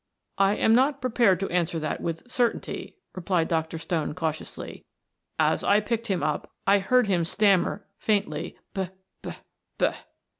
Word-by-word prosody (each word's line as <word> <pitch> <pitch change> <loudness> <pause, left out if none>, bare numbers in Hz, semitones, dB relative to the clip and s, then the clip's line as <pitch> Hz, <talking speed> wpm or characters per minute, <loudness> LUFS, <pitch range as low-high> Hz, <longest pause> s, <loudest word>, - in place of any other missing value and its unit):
"I 195 +1 +4
am 220 - +3
not 270 +4 +3
prepared 235 -7 +3
to 195 - -1
answer 170 -1 0
that 155 -1 -3
with 165 -1 -3
certainty," 240 -2 -1 0.2
replied 175 -2 0
Dr. 160 0 -1
Stone 160 -2 -2
cautiously. 160 -3 -5 0.5
"As - - +2
I 205 - +4
picked 230 +2 -2
him 190 -4 0
up 150 - -1 0.2
I 200 +1 +5
heard 250 +6 +3
him 185 -4 +1
stammer 200 +2 +2
faintly: 195 -7 -1 0.2
'B 190 -2 -2 0.3
b - - -6 0.4
b.'" - - +3
190 Hz, 150 wpm, -26 LUFS, 165-215 Hz, 0.5 s, I